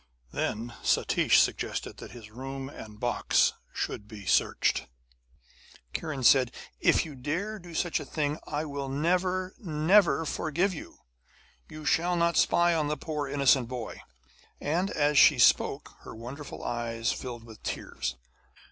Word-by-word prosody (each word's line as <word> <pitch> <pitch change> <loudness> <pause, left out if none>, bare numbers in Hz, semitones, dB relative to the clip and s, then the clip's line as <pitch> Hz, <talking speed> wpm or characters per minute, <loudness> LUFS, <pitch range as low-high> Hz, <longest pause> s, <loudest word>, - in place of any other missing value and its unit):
Then 115 +2 -3
Satish - - +2
suggested - - -1
that - - -9
his 115 -3 -12
room 135 +3 -6
and 105 -6 -11
box 120 0 +2 0.2
should 105 - -4
be 105 -3 -10
searched. - - +2 0.9
And - - -26
Kiran 150 -5 -4
said: 130 -2 +6 0.3
'If - - +3
you 155 - -8
dare 170 +12 -3
do 175 -1 -11
such 175 0 0
a - - -5
thing 150 -1 -2
I 150 +2 -2
will 140 -2 -4
never, 180 +6 0
never 165 0 +3
forgive 170 +6 0
you. 155 - -9 0.7
You 155 0 -9
shall 175 +4 +2
not 170 0 +2
spy 175 0 +4
on 155 -3 +1
the 150 +1 -1
poor 150 -3 -3
innocent 135 -3 +3
boy.' 120 -3 -6 0.6
And 175 +6 0
as 150 -4 +3
she - - +7
spoke, - - +3
her - - -10
wonderful 130 +6 -8
eyes 115 0 -1
filled 120 -3 -6
with 110 -2 -13
tears. 65 - -4
145 Hz, 145 wpm, -28 LUFS, 120-165 Hz, 0.9 s, she